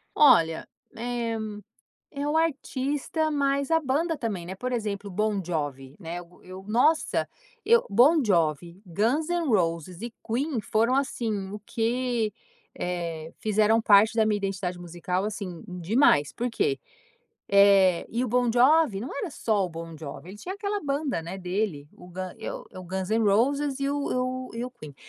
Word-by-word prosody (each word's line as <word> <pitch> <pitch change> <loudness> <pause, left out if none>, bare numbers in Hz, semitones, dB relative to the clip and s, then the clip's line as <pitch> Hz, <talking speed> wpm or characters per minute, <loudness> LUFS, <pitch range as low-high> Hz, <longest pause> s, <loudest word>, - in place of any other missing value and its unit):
Olha, 165 - +5 0.3
eh, 235 -1 -2 0.7
é 285 +1 -3
o 305 - +1
artista, 295 0 -1
mas 280 0 0
a 325 - +5
banda 315 +3 0
também, 205 -9 -3
né? 190 +2 -6
Por 255 +5 -4
exemplo, 210 -4 -3
o 185 - -10
Bon 210 -1 0
Jovi, 145 -5 -4
né, 175 0 -5
o 175 +1 -18
e 185 - -16
eu 190 +1 -8
Nossa! 255 +9 +2 0.4
Eu 470 +2 +5
Bon 270 +9 +5
Jovi, 170 - 0
Guns 230 - 0
N' 345 -3 0
Roses 170 - 0
e 235 0 -6
Queen 255 +3 -1
foram 225 +5 +1
assim, 220 -8 -2
o 210 - -6
que, 235 -2 -1 0.4
eh, 170 -3 -4
fizeram 215 +1 +3
parte 215 +1 +5
da 220 -1 +4
minha 210 -1 +2
identidade 190 -3 -3
musical, 175 +2 -3
assim 195 -5 -5
demais, 180 - +3
por 245 +1 -2
quê? 405 - 0 0.7
Eh 200 -3 +5
e 235 +2 -1
o 255 - -1
Bon 245 +1 +2
Jovi 255 -2 +4
não 240 +6 -6
era 340 +6 -3
só 215 -8 0
o 180 - -6
Bon 165 0 -8
Jovi, 155 +3 -8
ele 200 - -10
tinha 370 - -6
aquela 410 0 -2
banda, 280 - -1
né, 170 +4 -6
dele, 180 -5 -2
o 180 - -14
Gun 185 +1 -6
e - - -4
o 185 - -8
Guns 190 +1 -4
N' 225 +1 +2
Roses 270 +7 +2
e 275 - 0
o 285 0 -2
e - - 0
o 255 0 -2
e - - -2
o 250 - -8
Queen, 150 - -12
215 Hz, 175 wpm, -26 LUFS, 180-265 Hz, 0.7 s, Olha